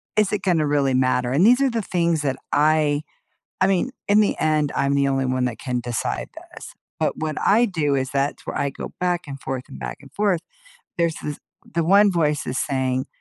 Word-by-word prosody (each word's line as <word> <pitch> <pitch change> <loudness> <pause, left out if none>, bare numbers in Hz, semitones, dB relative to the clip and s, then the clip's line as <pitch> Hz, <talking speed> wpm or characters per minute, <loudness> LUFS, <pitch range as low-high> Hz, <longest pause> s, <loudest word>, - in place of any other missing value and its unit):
is 215 -2 +2
it 210 -2 -1
gonna 170 -5 +2
really 140 -2 +2
matter? 130 -1 +1
And 150 +9 +4
these 245 +4 +5
are 275 - +3
the 230 -2 -1
things 170 -5 0
that 135 -2 -1
I 150 0 +3 0.6
I 190 - +5
mean, 195 +6 +1 0.2
in 205 +1 +5
the 210 - +2
end, 155 -2 +1
I'm 140 - +1
the 140 0 +2
only 135 -1 0
one 130 0 0
that 120 -2 -4
can 125 -2 -2
decide 120 -1 -3 0.2
this, - - -11 0.3
but - - 0
what 155 -1 -3
I 225 +4 +4
do 155 -8 0
is 130 -1 -1
that's 140 +1 -2
where - - -4
I 140 - +1
go - - -8
back 175 -1 0
and 140 -1 -8
forth 130 -1 -4
and - - -10
back - - -6
and 140 -1 -16
forth. 200 -2 +1 0.6
There's 170 -2 +1
this 150 -1 -4 0.4
the 170 -1 +1
one 200 +4 +5
voice 150 -4 0
is 130 - -2
saying, 130 -1 -1
150 Hz, 220 wpm, -22 LUFS, 135-180 Hz, 0.6 s, these